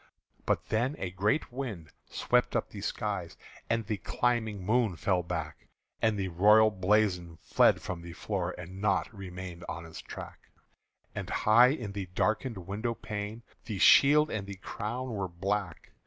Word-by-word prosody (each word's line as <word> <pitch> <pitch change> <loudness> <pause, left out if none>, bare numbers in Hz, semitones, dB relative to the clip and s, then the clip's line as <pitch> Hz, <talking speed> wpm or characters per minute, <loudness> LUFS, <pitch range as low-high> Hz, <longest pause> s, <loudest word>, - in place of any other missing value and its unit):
But - - 0
then 120 +6 +1
a 95 - -4
great 105 - 0
wind 110 - -5 0.2
swept - - +1
up - - -1
the - - -8
skies, - - -3 0.3
And 115 -1 0
the 105 0 -2
climbing 110 -1 -1
moon 110 -2 +2
fell 90 +1 +1
back; 80 -3 -5 0.3
And 110 -2 +2
the 95 -1 -2
royal 105 +5 +6
blazon 95 -4 +1
fled - - +3
from 90 -2 -5
the 85 0 -9
floor, 95 -1 -3
And 90 +2 -8
naught 105 +3 +1
remained 90 -2 -8
on 85 +3 -5
its 80 - -9
track; - - -10 0.6
And - - -5
high 115 +3 +6
in 120 -8 -3
the 100 -2 -5
darkened 110 +1 0
window 105 +6 -3
pane 105 +1 -5 0.2
The 105 -4 -4
shield 150 +9 +6
and 100 -2 -3
the 100 - -6
crown 120 +6 -5
were 100 -3 -2
black. 95 0 -3
100 Hz, 160 wpm, -30 LUFS, 90-110 Hz, 0.6 s, royal